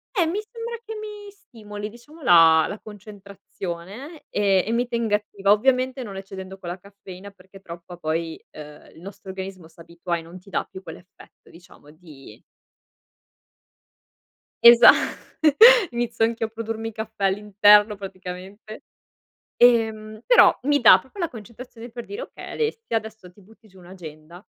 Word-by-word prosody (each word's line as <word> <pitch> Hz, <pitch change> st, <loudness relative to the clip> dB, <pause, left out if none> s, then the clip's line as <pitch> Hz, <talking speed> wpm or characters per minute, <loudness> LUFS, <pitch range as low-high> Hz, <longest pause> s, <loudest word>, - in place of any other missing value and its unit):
Eh, 355 Hz, -, +2 dB
mi 350 Hz, +6 st, -2 dB
sembra 470 Hz, 0 st, -7 dB
che 445 Hz, 0 st, -8 dB
mi 420 Hz, -1 st, -9 dB
stimoli, 210 Hz, -, -10 dB
diciamo 295 Hz, +8 st, -17 dB
la 165 Hz, -3 st, +6 dB
la 205 Hz, -, -7 dB
concentrazione 200 Hz, -, -10 dB
e 195 Hz, -2 st, +1 dB
e 225 Hz, -, -3 dB
mi 240 Hz, +1 st, 0 dB
tenga 230 Hz, -3 st, -1 dB
attiva. 200 Hz, -1 st, -2 dB
Ovviamente 255 Hz, +4 st, +1 dB
non 200 Hz, -4 st, -9 dB
eccedendo 190 Hz, 0 st, -9 dB
con 180 Hz, -2 st, -9 dB
la 180 Hz, +2 st, -6 dB
caffeina 200 Hz, 0 st, -13 dB
perché 195 Hz, 0 st, -18 dB
troppa 170 Hz, 0 st, -11 dB
poi, 160 Hz, 0 st, -4 dB
ehm, 150 Hz, 0 st, -14 dB
il 165 Hz, -, -16 dB
nostro 195 Hz, 0 st, -12 dB
organismo 190 Hz, -3 st, -8 dB
s'abitua 170 Hz, +1 st, -6 dB
e -, -, -8 dB
non 170 Hz, +3 st, -13 dB
ti 195 Hz, -, -19 dB
dà -, -, -2 dB
più 190 Hz, -, -12 dB
quell'effetto 175 Hz, +2 st, -15 dB
diciamo 165 Hz, -3 st, -18 dB
di 155 Hz, -4 st, -16 dB, 2.2 s
Esa 235 Hz, 0 st, +9 dB, 1.0 s
inizio 235 Hz, -1 st, -1 dB
anch'io 230 Hz, 0 st, -3 dB
a -, -, -18 dB
produrmi 225 Hz, 0 st, -6 dB
caffè 220 Hz, -1 st, -5 dB
all'interno 205 Hz, +1 st, +4 dB
praticamente. 190 Hz, +2 st, -10 dB, 0.7 s
Ehm, 220 Hz, -2 st, +2 dB
però -, -, +6 dB
mi 285 Hz, +1 st, +1 dB
dà 200 Hz, -5 st, +8 dB
proprio 265 Hz, -, -13 dB
la 340 Hz, -, -1 dB
concentrazione, 235 Hz, +1 st, -12 dB
per 240 Hz, 0 st, -9 dB
dire: 425 Hz, +5 st, -8 dB
okay -, -, -10 dB
Alessia, 450 Hz, -, -3 dB
adesso 220 Hz, -4 st, -7 dB
ti 205 Hz, -, -22 dB
butti 220 Hz, +2 st, -22 dB
giù 190 Hz, -, -20 dB
un'agenda 175 Hz, 0 st, -13 dB
205 Hz, 150 wpm, -22 LUFS, 185-235 Hz, 2.2 s, Esa